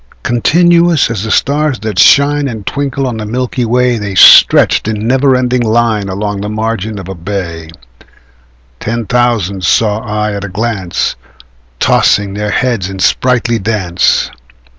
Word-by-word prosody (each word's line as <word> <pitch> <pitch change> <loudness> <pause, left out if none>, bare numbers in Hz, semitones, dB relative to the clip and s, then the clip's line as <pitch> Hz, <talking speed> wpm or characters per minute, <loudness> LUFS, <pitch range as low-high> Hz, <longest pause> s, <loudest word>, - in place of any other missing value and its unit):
Continuous 170 +4 +2
as 110 -4 -3
the 110 - -5
stars 145 +2 0
that 110 -3 -3
shine 145 0 +4
And 110 -5 -7
twinkle 140 -1 -3
on 120 -3 -3
the 110 - -5
milky 125 +2 -2
way, 125 0 +1
The 100 -2 -5
stretched 95 - +6
in 110 -1 -3
never 130 +2 +2
ending 125 -1 0
line 110 -3 0
Along 100 +1 -4
the 105 - -4
margin 110 -1 -3
of 95 -2 -8
a 95 - -6
bay: 85 -3 -6 1.1
Ten 115 +1 -3
thousand 115 -6 -1
saw 105 +4 +1
I 105 -1 -3
at 100 0 -5
a 100 - -5
glance, 100 -3 -3 0.6
Tossing 100 -1 +2
their 105 +1 -3
heads 115 -3 -1
in 95 - -7
sprightly 120 +3 0
dance. 95 -4 0
110 Hz, 150 wpm, -12 LUFS, 100-125 Hz, 1.1 s, stretched